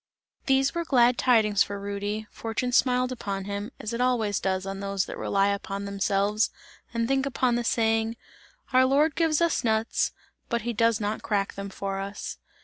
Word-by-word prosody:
These 270 0 +3
were 340 - -1
glad 250 -6 +4
tidings 215 -5 +3
for 200 0 0
Rudy, 205 +2 -3
fortune 230 +2 -3
smiled 250 0 +3
upon 195 -6 -4
him, 205 +3 -4
as 220 - -4
it 235 - -1
always 230 -5 +1
does 190 0 -1
on 195 0 -5
those 195 -1 -1
that - - -7
rely 195 0 +1
upon 200 0 -3
themselves 200 +2 +1 0.4
and 230 -1 -1
think 270 +1 +1
upon 255 -2 +1
the 240 0 0
saying: 225 0 +1 0.6
"Our 255 0 +6
Lord 290 +4 +3
gives 325 -1 +1
us 335 -2 +2
nuts, 220 -1 +1 0.4
but 235 -2 -1
he 240 0 -2
does 230 0 +2
not 210 +1 -2
crack 200 -2 -1
them 200 0 -6
for 195 0 -4
us!" 200 +1 -6
220 Hz, 180 wpm, -26 LUFS, 200-250 Hz, 0.6 s, Our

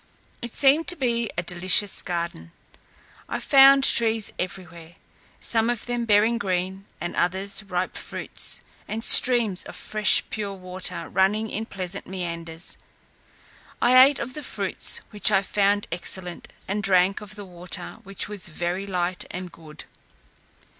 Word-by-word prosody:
It 240 -1 -4
seemed 290 +4 +4
to 355 - +3
be 235 - -1
a 175 - -1
delicious 180 +3 +2
garden. 170 - -5 0.8
I - - -3
found 275 0 +6
trees 225 -4 +4
everywhere, 170 -2 -7 0.4
some 225 0 0
of 240 -2 -2
them 240 -1 -2
bearing 220 +2 +3
green, 190 0 -3
and 175 +2 -5
others 190 +3 0
ripe 185 -2 -3
fruits, - - -2 0.3
and 225 +1 -5
streams 235 -7 +5
of - - -10
fresh 215 -1 +1
pure 205 -2 -4
water 185 0 -3
running 205 +4 +1
in 220 +2 -4
pleasant 190 -2 -6
meanders. 170 -2 -4 1.0
I 255 +1 +7
ate 280 +1 +3
of 250 +2 -5
the 300 - -6
fruits, 200 -8 0
which 210 -2 +2
I 195 -2 +2
found 205 +1 +1
excellent; 175 +1 -2 0.2
and 205 +2 -2
drank 190 0 +2
of 210 0 -9
the 205 -1 -9
water, 180 -1 -8
which 195 0 -7
was 205 -2 -2
very 175 +4 -4
light 180 -1 -2
and 180 -1 -7
good. 155 -2 -11
195 Hz, 145 wpm, -24 LUFS, 180-220 Hz, 1.0 s, I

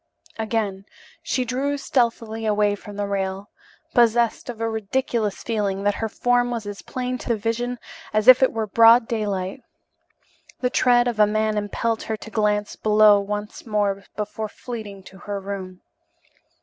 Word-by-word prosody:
Again 215 -3 -2 0.4
she 320 -7 -1
drew 270 +4 -1
stealthily 230 -4 -1
away 210 -1 +2
from 205 0 -9
the 205 0 -2
rail, 195 0 -3 0.4
possessed 235 -1 +2
of 235 -2 -6
a 225 - -1
ridiculous 220 -1 -2
feeling 200 -4 -1
that 205 0 +2
her 225 - -1
form 245 +2 +1
was 235 -3 -4
as 205 -1 -7
plain 250 0 -4
to - - -8
the 230 - +2
vision 240 +3 -2 0.3
as 215 0 0
if 255 0 +9
it 260 - +4
were 225 -1 -2
broad 230 +3 +6
daylight. 205 -1 -2 1.0
The 250 -1 0
tread 245 -2 +4
of 235 -3 -2
a 210 - +6
man 215 0 0
impelled 215 +2 -1
her 220 - -3
to 220 - -11
glance 210 -1 0
below 210 -1 +5
once 210 +3 -5
more 205 -2 0
before 215 +1 -4
fleeing 210 -5 -8
to 190 0 -14
her 205 0 -5
room. 190 -2 -7
215 Hz, 160 wpm, -23 LUFS, 205-235 Hz, 1.0 s, if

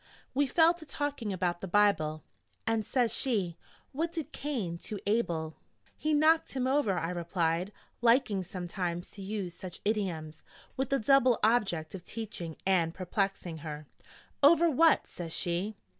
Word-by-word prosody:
We 280 +1 +2
fell 325 +5 +5
to 345 -2 -12
talking 290 -7 -3
about 180 -2 -1
the 190 - -4
Bible. 175 -6 +2 0.4
And 225 -1 +1
says 240 -1 +1
she: 200 -12 0 0.4
'What 320 +5 -2
did 325 -5 -5
Cain 220 - -3
to 210 - -5
Abel?' 170 -8 0 0.4
'He 310 - -1
knocked 310 +2 +4
him 260 -2 -1
over,' 260 -8 +2
I 165 0 -1
replied, 170 +1 -1 0.3
liking 230 -5 +3
sometimes 175 -1 -4
to 200 - -10
use 195 -3 -4
such 180 0 -8
idioms, 175 -8 -2 0.3
with 265 0 -1
the 275 - +2
double 255 0 +4
object 195 -9 +2
of 190 -3 -7
teaching 180 -7 -6
and 175 -4 +2
perplexing 185 -2 -2
her. 150 -1 -7 0.6
'Over 330 +3 +6
what?' 320 +4 +4
says 165 -2 -7
she. 180 +4 -1
200 Hz, 150 wpm, -30 LUFS, 175-260 Hz, 0.6 s, Over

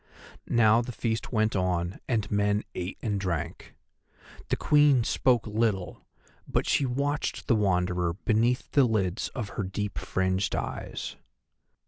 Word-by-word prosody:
Now 115 0 +4
the 120 - -5
feast 115 -1 -2
went 110 -2 +1
on 90 -1 -1
and 110 -5 -1
men 105 0 +1
ate 90 +1 -4
and 105 -3 -1
drank. 90 -5 -4 0.7
The - - +2
Queen 145 -4 +4
spoke 120 0 +2
little, 105 -4 -1 0.4
but - - 0
she 140 - +2
watched 140 +4 -2
the 120 - +3
Wanderer 90 -4 +1
beneath 115 +6 0
the 140 -3 +5
lids 100 -6 0
of 115 -6 -3
her 100 - -3
deep 100 +2 -3
fringed 95 +1 0
eyes. - - -5
105 Hz, 135 wpm, -28 LUFS, 95-120 Hz, 0.7 s, the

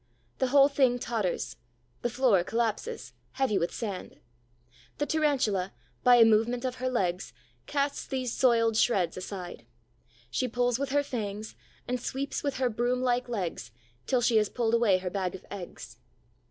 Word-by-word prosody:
The 260 - +2
whole 275 +1 +6
thing 265 -3 +2
totters, 200 - -2 0.4
the 240 - 0
floor 235 -7 +3
collapses, 235 - -2 0.2
heavy 260 -8 +1
with 170 - -1
sand. 200 -5 -6 0.8
The 290 - 0
Tarantula, 265 -12 +1 0.3
by 250 0 +7
a 235 -1 +8
movement 225 +3 +2
of 255 0 -2
her 255 0 -1
legs, 185 -7 -1 0.3
casts 280 0 -1
these 255 -3 -2
soiled 230 -3 +3
shreds 195 -7 +2
aside. 185 - -7 0.7
She 255 - 0
pulls 245 0 0
with 280 - -2
her 285 +1 +2
fangs 215 -5 -5 0.3
and 250 0 -2
sweeps 275 +2 -3
with 280 -2 -2
her 260 -1 +2
broom 245 +2 0
like 245 0 +1
legs, 180 - -3 0.4
till 255 -2 +2
she 230 -1 +3
has 210 -1 +3
pulled 230 -2 -1
away 230 -5 +4
her 180 -1 -4
bag 190 -2 -2
of 190 - -11
eggs. 190 -4 -8
240 Hz, 160 wpm, -29 LUFS, 200-255 Hz, 0.8 s, a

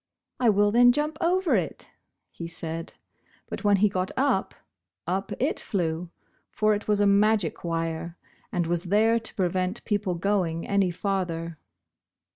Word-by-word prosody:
"I 245 -2 +4
will 205 0 +3
then 245 +2 +6
jump 300 +3 -2
over 365 +1 +2
it," - - -1 0.4
he 170 - -7
said. 165 0 -5 0.5
But - - -6
when 205 -1 +5
he 210 +2 +4
got 185 -1 -2
up, 260 -7 +1 0.5
up 190 +3 -2
it 270 +5 0
flew, 170 -3 -2 0.4
for 215 0 +2
it 205 - -3
was 210 -1 +2
a 205 - +4
magic 200 -3 +2
wire, 165 0 -3 0.3
and 175 -2 0
was 170 +2 -1
there 220 +5 +3
to 225 - -5
prevent 185 +2 -1
people 205 -4 0
going 170 -3 -1
any 200 -2 +2
farther. 170 -4 -3
195 Hz, 150 wpm, -26 LUFS, 170-215 Hz, 0.5 s, then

